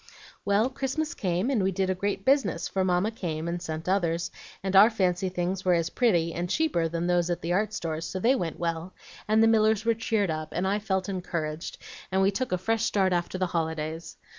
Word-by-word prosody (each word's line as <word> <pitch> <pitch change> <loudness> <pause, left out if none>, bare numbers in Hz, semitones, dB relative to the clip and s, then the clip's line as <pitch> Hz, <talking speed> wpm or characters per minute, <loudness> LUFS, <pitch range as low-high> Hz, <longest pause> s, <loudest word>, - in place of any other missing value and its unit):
"Well, 205 +4 +3
Christmas 280 +4 -2
came, 185 +5 -1
and 240 -7 +2
we 190 0 +1
did 190 0 0
a - - +2
great 195 +1 -3
business, 260 - +2
for 190 - -1
Mamma 185 +3 +1
came 165 -7 -4
and 175 +1 -3
sent 160 -1 -5
others, 175 -3 0 0.3
and 190 0 -1
our 205 +4 +9
fancy 185 -4 0
things 180 +1 -2
were 180 -1 +3
as 170 0 0
pretty 170 -9 +2
and 175 +1 -3
cheaper 295 - +1
than 170 +1 -2
those 175 -1 +2
at 175 - -2
the 170 +1 0
art 210 +3 +1
stores, 165 -4 -3
so 190 - -4
they 235 +7 +4
went 175 -11 -2
well, 170 +1 -3 0.3
and 220 +1 +4
the - - +6
Millers 220 -1 +3
were 230 - +4
cheered 220 -4 0
up, 155 0 -5
and 180 +3 0
I 200 +2 +1
felt 190 -3 -1
encouraged, 170 -4 -4 0.3
and 190 - +2
we 195 - +4
took 230 +3 -3
a 185 - +2
fresh 225 +4 0
start 195 -5 +2
after 175 +1 -1
the 185 - +1
holidays. 160 0 -3
185 Hz, 220 wpm, -27 LUFS, 170-210 Hz, 0.3 s, our